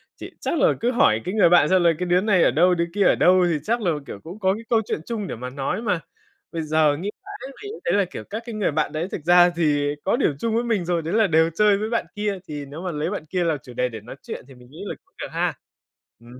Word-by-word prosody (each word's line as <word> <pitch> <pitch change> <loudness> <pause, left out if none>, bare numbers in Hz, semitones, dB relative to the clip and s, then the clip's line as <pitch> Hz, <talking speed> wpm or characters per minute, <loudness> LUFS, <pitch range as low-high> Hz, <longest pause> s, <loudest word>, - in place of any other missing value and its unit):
Chị - - -9
chắc 335 - -1
là - - +4
cứ 240 +2 +1
hỏi 110 - +3
cái 185 - -3
người 210 -5 +5
bạn 175 -4 +5
xem 185 -1 +4
là 170 - +5
cái 180 - -1
đứa 180 +1 +3
này 195 -4 +3
ở - - +4
đâu, 175 +7 +4
đứa 170 0 0
kia 205 0 +2
ở - - +5
đâu 185 0 +4
thì 165 - +1
chắc 235 +6 0
là, 180 -5 +1
kiểu, 100 - -8
cũng 180 +6 -9
có 190 -2 +2
cái 220 +3 -7
câu 230 -2 +3
chuyện - - -2
chung 215 -4 -4
để - - -4
mà 125 +2 -6
nói 135 - -3
mà. 205 -7 0 0.5
Bây 165 - -3
giờ 155 -1 +2
nghĩ 190 +6 -4 0.2
mãi 405 -9 -8
mình 410 - -6
cũng 450 - -9
thấy 170 - +1
là, 200 0 +3
kiểu, 180 - -8
các 220 +3 -6
cái 235 -2 -6
người 210 -6 0
bạn 155 +1 0
đấy 155 +3 -3
thực 155 - -5
ra 175 0 +7
thì 145 -4 0
có - - +2
điểm 160 - +1
chung 225 +4 -1
với 235 - +1
mình 220 -7 0
rồi, 170 -1 0
đấy 165 +3 -4
là 220 -1 +4
đều 160 0 +3
chơi 210 0 +4
với 215 +2 -3
bạn 230 0 0
kia, 205 -2 -2
thì 145 -2 -6
nếu 145 +4 -9
mà 180 -1 -3
lấy 150 +1 -2
bạn 200 -6 -5
kia 180 +3 -1
là 165 -3 +1
chủ 125 - -11
đề 125 +1 0
để 110 -3 -8
nói 120 - -10
chuyện - - -7
thì 135 - -14
mình 125 0 -17
nghĩ 155 - -9
là - - -4
cũng - - -37
được - - -3
ha. - - 0 0.7
Ừm 120 +2 -14
175 Hz, 305 wpm, -23 LUFS, 155-210 Hz, 0.7 s, ra